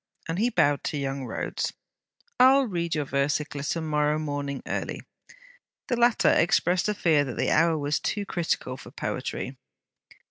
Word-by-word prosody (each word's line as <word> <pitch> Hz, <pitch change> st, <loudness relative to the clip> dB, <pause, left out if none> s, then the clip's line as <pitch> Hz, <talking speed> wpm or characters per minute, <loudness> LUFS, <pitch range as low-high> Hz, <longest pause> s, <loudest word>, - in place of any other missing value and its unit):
and 165 Hz, +3 st, -2 dB
he 235 Hz, +3 st, +3 dB
bowed 145 Hz, -, +2 dB
to 150 Hz, -, -2 dB
young 135 Hz, -1 st, -3 dB
Rhodes: 115 Hz, -, -3 dB, 0.7 s
'I 255 Hz, +1 st, +8 dB
'll 275 Hz, -1 st, +3 dB
read 170 Hz, -6 st, -2 dB
your 150 Hz, -1 st, -1 dB
versicler 145 Hz, +1 st, -1 dB
to 165 Hz, -, -3 dB
morrow 150 Hz, -1 st, +1 dB
morning 145 Hz, -2 st, -3 dB
early.' -, -, -3 dB, 0.9 s
The 245 Hz, -, +2 dB
latter 240 Hz, 0 st, +4 dB
expressed 180 Hz, +2 st, +2 dB
a 210 Hz, -, 0 dB
fear 155 Hz, -6 st, +3 dB
that 130 Hz, -4 st, -6 dB
the -, -, +1 dB
hour 165 Hz, +1 st, +3 dB
was 145 Hz, 0 st, 0 dB
too 205 Hz, -1 st, -2 dB
critical 160 Hz, -8 st, -2 dB
for -, -, -11 dB
poetry. -, -, -4 dB
155 Hz, 165 wpm, -26 LUFS, 145-180 Hz, 0.9 s, I